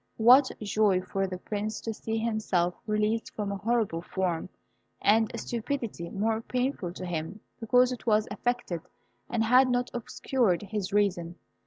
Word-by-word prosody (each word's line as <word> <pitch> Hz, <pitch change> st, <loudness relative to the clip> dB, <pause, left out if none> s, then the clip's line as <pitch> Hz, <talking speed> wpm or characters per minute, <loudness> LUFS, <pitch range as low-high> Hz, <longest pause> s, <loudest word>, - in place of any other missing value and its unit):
What 255 Hz, +4 st, +7 dB
joy 205 Hz, -3 st, +2 dB
for 195 Hz, +1 st, -1 dB
the 185 Hz, -1 st, -5 dB
Prince 210 Hz, +3 st, -4 dB
to 225 Hz, -, -3 dB
see 220 Hz, +1 st, -3 dB
himself 215 Hz, -6 st, 0 dB
released 215 Hz, +1 st, 0 dB
from 205 Hz, -2 st, -2 dB
a 200 Hz, -, -3 dB
horrible 215 Hz, -6 st, 0 dB
form, 180 Hz, -1 st, -2 dB, 0.5 s
and 220 Hz, +1 st, +4 dB
a -, -, -6 dB
stupidity 230 Hz, -7 st, -4 dB
more 220 Hz, +2 st, 0 dB
painful 250 Hz, -7 st, -2 dB
to 185 Hz, -, -6 dB
him 175 Hz, +3 st, -4 dB, 0.2 s
because 250 Hz, +2 st, +4 dB
it 245 Hz, -1 st, -7 dB
was 215 Hz, -1 st, +3 dB
affected 215 Hz, -5 st, -2 dB, 0.5 s
and 235 Hz, -2 st, +1 dB
had 255 Hz, +3 st, +5 dB
not 245 Hz, 0 st, 0 dB
obscured 235 Hz, -4 st, 0 dB
his 205 Hz, -2 st, -3 dB
reason. 180 Hz, -4 st, +1 dB
215 Hz, 155 wpm, -28 LUFS, 190-235 Hz, 0.5 s, What